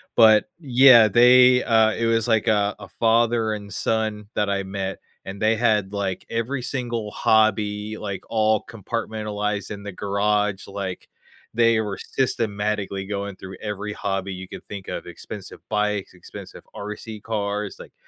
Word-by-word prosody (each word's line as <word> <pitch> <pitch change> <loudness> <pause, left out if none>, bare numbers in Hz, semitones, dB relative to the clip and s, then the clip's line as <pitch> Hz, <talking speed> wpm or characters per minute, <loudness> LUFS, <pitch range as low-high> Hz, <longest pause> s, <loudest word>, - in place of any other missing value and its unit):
But, 110 -2 +6
yeah, 130 -5 +7
they, 125 +3 +6
uh 110 -1 +4
it 115 - -1
was 115 0 +1
like, 110 -2 +2
uh, 105 -1 +2
a 100 - -10
father 115 +2 +2
and 105 -1 -7
son 110 -2 -1
that 105 -1 +1
I 100 0 0
met, 95 0 -4 0.3
and 95 +1 -8
they 110 +1 +3
had, 105 -4 +1
like, 100 -2 -3
every 120 +3 -2
single 120 -4 -3
hobby, 110 -1 +1
like, 100 -3 -5
all 110 -1 +2
compartmentalized 105 -1 -3
in 100 - -6
the 100 - -6
garage, 100 +1 0
like, 100 -2 -6 0.5
they 115 -1 +4
were 100 -3 -4
systematically 105 -5 -2
going 100 -1 -4
through 95 0 -10
every 105 0 -4
hobby 95 -1 -3
you 95 0 -8
could - - -10
think 100 -2 -8
of. - - -5
Expensive - - -9
bikes, 105 -2 -1
expensive 90 - -11
RC 105 +1 -7
cars, 105 -2 -3
like, - - -12
105 Hz, 155 wpm, -23 LUFS, 100-115 Hz, 0.5 s, yeah